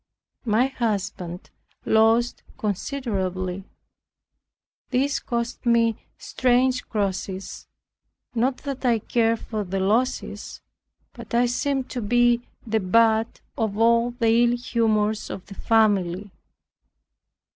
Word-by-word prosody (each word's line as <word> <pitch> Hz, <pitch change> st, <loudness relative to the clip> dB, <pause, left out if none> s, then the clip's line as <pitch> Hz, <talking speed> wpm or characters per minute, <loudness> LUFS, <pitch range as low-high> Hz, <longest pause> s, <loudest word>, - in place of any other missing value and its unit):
My 225 Hz, +2 st, +3 dB
husband 200 Hz, -8 st, -3 dB, 0.3 s
lost 225 Hz, +2 st, +3 dB, 0.2 s
considerably. 190 Hz, -5 st, -3 dB, 1.2 s
This 275 Hz, +2 st, +1 dB
cost 235 Hz, 0 st, -3 dB
me 230 Hz, -2 st, +3 dB, 0.2 s
strange 255 Hz, 0 st, +1 dB
crosses, 195 Hz, -2 st, -3 dB, 0.7 s
not 250 Hz, +2 st, +1 dB
that 275 Hz, -2 st, -4 dB
I 240 Hz, -3 st, +3 dB
cared 225 Hz, +1 st, +1 dB
for 215 Hz, -2 st, -3 dB
the 195 Hz, 0 st, -3 dB
losses, 220 Hz, +7 st, -1 dB, 0.5 s
but -, -, -7 dB
I 240 Hz, +1 st, +4 dB
seemed 265 Hz, +2 st, -1 dB
to 245 Hz, -, -3 dB
be 240 Hz, +2 st, +3 dB, 0.2 s
the 220 Hz, -1 st, +1 dB
butt 220 Hz, +3 st, +2 dB
of 215 Hz, -3 st, -2 dB
all 230 Hz, +1 st, +4 dB
the 235 Hz, -2 st, 0 dB
ill 240 Hz, 0 st, +2 dB
humors 220 Hz, -3 st, 0 dB
of 185 Hz, -, -7 dB
the 200 Hz, -, -11 dB
family. 205 Hz, -3 st, +1 dB
230 Hz, 105 wpm, -24 LUFS, 205-240 Hz, 1.2 s, I